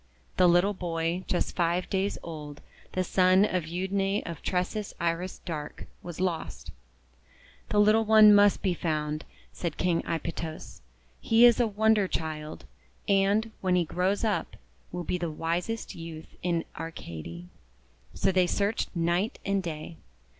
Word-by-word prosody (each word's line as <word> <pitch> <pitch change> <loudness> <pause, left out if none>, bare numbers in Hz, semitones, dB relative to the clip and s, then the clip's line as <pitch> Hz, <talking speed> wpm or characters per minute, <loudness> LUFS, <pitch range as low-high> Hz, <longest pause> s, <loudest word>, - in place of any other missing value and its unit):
The 180 - +6
little 175 +4 +4
boy, 170 -1 -2
just 180 - -1
five 175 +1 +1
days 195 +1 -1
old, 150 -3 -8 0.3
the 185 - +1
son 185 +2 +4
of 180 -5 -1
Euadne 195 +3 -1
of 170 -3 -6
Tresses 190 +3 -2
Iris 170 +2 -1
Dark, 155 -4 -6 0.2
was 175 -2 -8
lost. 180 -3 -3 1.0
"The 210 - +2
little 215 +2 +5
one 215 -1 +8
must 205 0 +5
be 190 -3 +2
found," 155 -2 -2 0.3
said 170 - -4
King 175 -2 +1
Aipytos. 165 -1 -5 0.4
"He 230 +1 +5
is 240 -1 +6
a 240 - +3
wonder 215 -1 +3
child, 155 - -5 0.4
and, 200 +3 +2
when 185 -1 +2
he 175 -1 +2
grows 185 +6 0
up, 215 -3 -1 0.4
will 175 0 -4
be 180 +2 -2
the 170 -1 -2
wisest 170 +8 -3
youth 165 -1 -9
in 170 -2 0
Arcady." 85 - -7 0.7
So - - +2
they 185 -1 +3
searched 205 +4 0
night 175 +5 0
and 200 0 +1
day. 165 -1 -6
180 Hz, 145 wpm, -28 LUFS, 165-200 Hz, 1.0 s, one